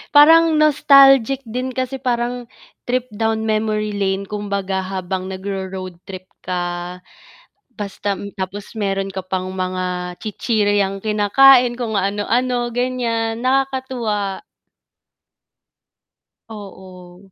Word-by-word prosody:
parang 325 +2 +7
nostalgic 275 -3 +5
din 250 +3 -3
kasi 260 +1 -3
parang 245 -1 -2 0.4
trip 255 0 0
down 220 0 0
memory 215 -1 0
lane 195 0 -1
kumbaga 200 -2 -3
habang 185 0 -4
nagro-road 190 -2 -6
trip 185 -1 -9 0.2
ka, 175 0 -4 0.7
basta 200 -1 -4 0.2
tapos 195 +2 -6
meron 195 -2 -1
ka 190 - -4
pang 185 0 -3
mga 180 -1 -3
chichiryang 205 -3 0
kinakain, 240 +4 +5
kung 220 -3 -2
ano-ano 240 +5 0
ganiyan, 235 -2 -1
nakakatuwa. 255 -6 -1 2.1
Oo. 190 -2 -12
205 Hz, 95 wpm, -19 LUFS, 190-245 Hz, 2.1 s, parang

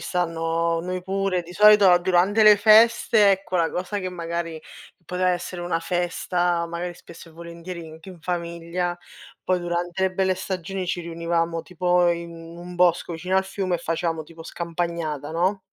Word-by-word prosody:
stanno 165 -1 -1
noi 180 +1 -4
pure, 190 -1 -1
di 175 +1 -12
solito 205 -2 +7
durante 185 +4 +2
le 210 -1 +8
feste, 215 0 +5
ecco, 190 -1 -1
la 165 -1 +1
cosa 185 +3 -3
che 185 - -3
magari 170 -2 -5 0.4
poteva 180 +2 0
essere 180 0 -4
una 175 -1 -2
festa, 175 0 -1
magari 175 +1 -5
spesso 165 0 -14
e - - -17
volentieri 170 0 -9
anche 160 +4 -13
in 180 -3 -12
famiglia, 170 0 -3 0.5
poi 185 -1 +1
durante 175 +1 -3
le 190 0 +1
belle 190 0 +1
stagioni 185 0 -4
ci 180 0 -2
riunivamo 165 0 -2
tipo 180 +1 +1
in 170 0 -4
un 170 +2 -10
bosco 175 -1 +2
vicino 180 +3 -2
al 190 - +2
fiume 190 -1 -2
e - - -12
facevamo 165 -1 -2
tipo 165 +1 -13
scampagnata, 170 -3 -4
no? 185 +4 0
175 Hz, 165 wpm, -23 LUFS, 170-185 Hz, 0.5 s, le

